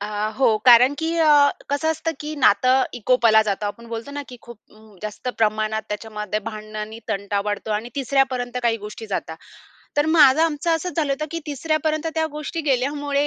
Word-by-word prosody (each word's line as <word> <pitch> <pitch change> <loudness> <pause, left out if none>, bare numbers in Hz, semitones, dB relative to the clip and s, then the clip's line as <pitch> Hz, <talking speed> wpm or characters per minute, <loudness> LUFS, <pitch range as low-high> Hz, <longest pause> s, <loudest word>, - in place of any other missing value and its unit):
अ, 205 - -4 0.3
हो. 225 -5 +4
कारण 250 +3 +7
की 325 0 -1
अ, 295 -3 +5 0.2
कसं 285 +3 0
असतं 320 +1 -2
की 305 +1 -5
नातं 255 +2 +4
विकोपाला 230 -2 +4
जातं 205 0 -2
आपण 235 +3 -7
बोलतो 230 +4 -6
ना 290 0 -5
की 250 - -10
खूप 235 -2 -12
अं, 215 -2 -19
जास्त 215 +4 -5
प्रमाणात 215 0 0
त्याच्यामध्ये 210 0 -4
भांडणं 215 -1 -7
आणि 215 +1 -6
तंटा 200 0 -1
वाढतो 210 +1 -3
आणि 220 +3 -2
तिसऱ्यापर्यंत 260 -2 0
काही 230 -1 +2
गोष्टी 210 +1 -9
जातात. 160 -5 -4 0.6
तर 290 +1 +2
माझं, 310 -2 +6
आमचं 330 +1 0
असंच 340 +2 -1
झालं 295 -4 +1
होतं 305 +3 -3
की 335 - -3
तिसऱ्यापर्यंत 310 +2 -1
त्या 320 0 +1
गोष्टी 300 +2 -4
गेल्यामुळे 285 +2 0
250 Hz, 180 wpm, -22 LUFS, 215-295 Hz, 0.6 s, कारण